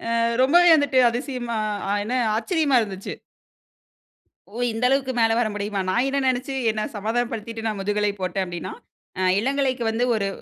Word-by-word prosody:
ஆ - - +1 0.3
ரொம்பவே 345 +6 +5
வந்துட்டு 285 -3 +2
அதிசயமா 240 -2 -4 0.5
என்ன 240 +4 -2 0.2
ஆச்சரியமா 305 - +1
இருந்துச்சு. 195 -2 -5 1.4
ஓ! - - -11 0.2
இந்த 225 - -4
அளவுக்கு 270 -1 +1
மேல 225 0 +3
வர 240 - +2
முடியுமா? 205 0 -3
நான் 240 +7 +1
என்ன 275 +1 0
நெனைச்சு 260 +1 -1 0.2
என்னை 215 0 -3
சமாதானம் 230 +4 -1
படுத்திட்டு, 225 0 -6
நான் 210 -2 -3
முதுகலை 205 +1 0
போட்டேன் 185 +1 -1
அப்டினா, 175 -1 -6 0.7
இளங்கலைக்கு 260 +1 0
வந்து 225 +2 0
ஒரு 200 -2 -1
235 Hz, 150 wpm, -23 LUFS, 210-265 Hz, 1.4 s, ரொம்பவே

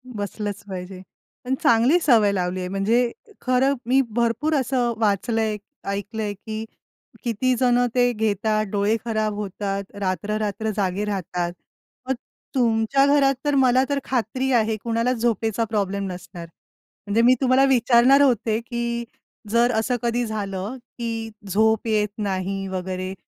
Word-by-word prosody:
बसलंच 205 0 -4
पाहिजे. 185 0 -7 0.4
पण 260 +1 0
चांगली 240 +9 +5
सवय 220 -8 +4
लावलीये 180 -1 -2
म्हणजे 225 +6 +1 0.3
खरं 255 +2 +2
मी 260 +3 +3 0.2
भरपूर 240 +7 +1
असं 250 -3 +1
वाचलंय, 215 +1 +1 0.3
ऐकलंय, 205 +1 -3
की 215 +2 -6 0.6
किती 245 +2 +1
जणं 245 -1 +3
ते 245 -1 +3
घेतात, 215 0 0
डोळे 205 +2 +2
खराब 215 -2 -1
होतात. 200 -1 -3
रात्र, 200 +2 -2
रात्र 215 +1 -2
जागे 195 0 0
राहतात. 180 -3 -2 0.6
मग 265 - +2 0.4
तुमच्या 240 +2 +3
घरात 280 -1 +4
तर 290 -1 +1
मला 260 -1 +4
तर 285 -1 0
खात्री 255 +1 -1
आहे, 220 -2 +2
कुणालाच 230 +2 0
झोपेचा 225 -1 +1
प्रॉब्लेम 200 -2 -1
नसणार. 175 -1 -9 0.6
म्हणजे 215 +3 +2
मी 250 +2 +6
तुम्हाला 260 +1 +4
विचारणार 255 +2 +5
होते, 230 -5 +2
की 235 0 -3 0.5
जर 235 +2 +3
असं 235 +3 0
कधी 240 +1 0
झालं, 205 +1 -4 0.2
की 225 -1 -3 0.2
झोप 220 +3 +2
येत 215 -2 +1
नाही 195 -1 -2
वगैरे 185 0 -4
220 Hz, 135 wpm, -23 LUFS, 200-245 Hz, 0.6 s, मी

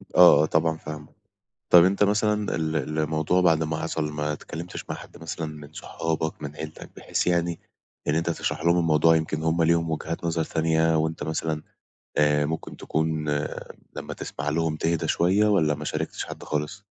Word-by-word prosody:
آه، 90 -3 +8
آه، - - +4
طبعًا 80 0 +1
فاهمك. 75 -1 -9 0.6
طَب، 85 -1 +9
أنت 100 +2 +3
مثلًا 105 0 +1
ال 80 -2 -1
الموضوع 80 +3 +1
بعد 80 -3 +4
ما 80 0 -1
حصل، 75 -1 -2
ما 75 0 -1
اتكلمتش 85 +3 -7
مع - - -2
حد - - -12
مثلًا 80 0 -4
من 75 -1 -10
صحابك، 80 -1 -3
من 75 0 -6
عيلتك، 80 0 -8
بحيث - - -2
يعني 85 -1 +1 0.5
إن 75 - +3
أنت 85 +1 0
تشرح 80 -1 -3
لهم 85 +1 +4
الموضوع. 80 -1 +4
يمكن 80 -1 -2
هُم 80 +1 +2
ليهم 85 0 +2
وجهات 80 +2 -3
نظر 80 -1 0
تانية، 80 0 +2
وأنت 80 +1 -1
مثلًا 80 -1 -2 0.5
آآ، 75 0 +3
ممكن 80 +1 -5
تكون 80 -1 -1 0.7
لمّا - - -5
تسمع 75 +2 -5
لهم 80 +1 0
تهدا 80 +1 0
شوية، 95 +5 +3
والّا 80 -8 +3
ما - - -7
شاركتش - - -3
حد - - -9
خالص؟ 75 +7 -3
80 Hz, 175 wpm, -25 LUFS, 75-85 Hz, 0.7 s, طَب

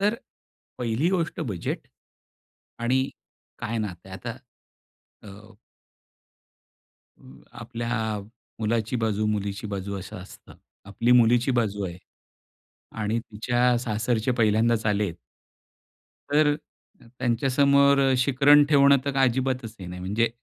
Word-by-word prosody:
तर 210 +3 +2 0.6
पहिली 120 +6 0
गोष्ट 170 -4 -1
बजेट 105 - -4 0.9
आणि 130 +3 +1 0.5
काय 115 -1 -3
नातं 95 -4 -5
आहे. 95 - -7
आता 115 +5 -6 0.9
अ 105 +3 -13 1.7
व 65 +1 -16 0.2
आपल्या 115 -2 -3 0.4
मुलाची 115 +2 0
बाजू, 110 -2 0
मुलीची 100 -1 -2
बाजू 100 0 -4
असं 95 0 -9
असतं. 90 +1 -12 0.3
आपली 115 +5 +1
मुलीची 120 +1 +4
बाजू 110 -5 0
आहे 90 -1 -6 1.0
आणि 110 +2 0
तिच्या 120 +2 0
सासरचे 115 +1 -1
पहिल्यांदाच 110 +1 +2
आलेत 105 -4 0 1.1
तर 150 0 +3 0.6
त्यांच्यासमोर 140 +3 +3
अ, - - +3
शिकरण 140 +3 +5
ठेवणं 140 -1 +6
तर 140 - -1
काय 135 -1 +4
अजिबातच 125 -2 -2
हे 90 - -7
नाही. 90 +1 -7
म्हणजे 105 +5 0
115 Hz, 110 wpm, -25 LUFS, 105-130 Hz, 1.7 s, ठेवणं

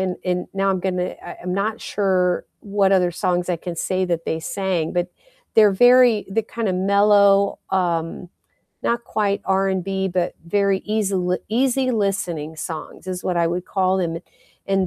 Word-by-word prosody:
and 185 -1 -1
and 180 0 -1
now 195 0 +1
I'm 185 -1 -1
gonna 180 -1 -2
I - - -8
I'm 180 +1 -3
not 215 +3 -1
sure 185 -3 0
what 200 -1 +1
other 180 -2 +3
songs 180 -1 -1
I 175 - +1
can 175 +1 -6
say 185 +2 -1
that 170 -2 -2
they 160 - -2
sang, 180 -2 -2
but 175 0 0 0.5
they're 215 -2 +7
very 245 +1 +5
they're 225 +3 0
kinda 220 -3 -3
mellow, 200 +1 +4
um, 175 -2 -1 0.6
not 235 0 0
quite 205 -3 -1
R&B, 190 0 0
but 180 -1 -1
very 200 +1 +2
easil 195 -4 0
easy 255 +3 +1
listening 180 -8 -2
songs 160 +3 -7
is 180 -1 -5
what 180 - -1
I 170 -1 +2
would 175 +1 -3
call 190 -1 +1
them, 170 -3 -1 0.5
and 195 -1 +1
190 Hz, 165 wpm, -21 LUFS, 180-200 Hz, 0.6 s, they're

